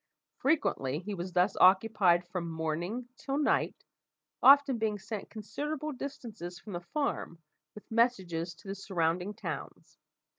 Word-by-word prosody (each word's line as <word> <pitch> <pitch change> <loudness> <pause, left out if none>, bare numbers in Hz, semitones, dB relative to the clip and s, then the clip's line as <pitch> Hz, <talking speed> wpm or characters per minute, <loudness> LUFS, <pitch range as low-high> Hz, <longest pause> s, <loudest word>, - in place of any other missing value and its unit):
Frequently 150 - +1
he 195 +5 -5
was 185 0 -4
thus 180 +3 +3
occupied 185 -2 +5
from 175 -1 -4
morning 165 +9 -3
till 275 0 -3
night, 295 - +1 0.6
often 275 -2 +7
being 215 -1 0
sent 205 +1 -6
considerable 295 +8 -4
distances 230 -10 -7
from 210 - -10
the 175 - -2
farm 280 - -3 0.4
with 210 - -13
messages 185 -8 +1
to 195 - -16
the 195 - -3
surrounding 180 0 -1
towns. - - -7
200 Hz, 135 wpm, -31 LUFS, 175-245 Hz, 0.6 s, often